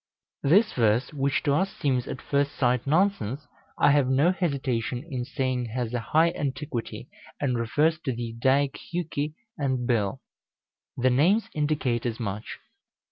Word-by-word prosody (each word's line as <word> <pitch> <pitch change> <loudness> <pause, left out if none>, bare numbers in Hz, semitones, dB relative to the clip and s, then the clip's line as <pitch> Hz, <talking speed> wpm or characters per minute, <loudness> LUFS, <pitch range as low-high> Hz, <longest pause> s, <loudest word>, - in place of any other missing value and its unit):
This 195 +10 +4
verse, 115 +4 +2
which 140 -1 0
to 145 - +2
us 190 +6 +1
seems 130 -4 0
at - - -6
first 140 0 0
sight 125 0 +1
nonsense, 150 - +1 0.3
I - - +5
have 140 -3 +3
no 140 +7 +4
hesitation 135 -8 -2
in 130 -6 -3
saying 130 -2 -1
has 120 0 -3
a 120 - 0
high 160 +9 +3
antiquity, 140 -5 -4 0.3
and 130 -4 0
refers 150 +8 +1
to 135 - +1
the 115 -1 -4
Eddaic 135 +3 +2
Hjuki 155 -3 -2 0.2
and 130 -3 0
Bil. 105 -5 0 0.8
The 130 +1 +3
names 175 - +3
indicate 145 -6 0
as 115 0 -4
much. 105 -2 -4
135 Hz, 150 wpm, -26 LUFS, 120-150 Hz, 0.8 s, I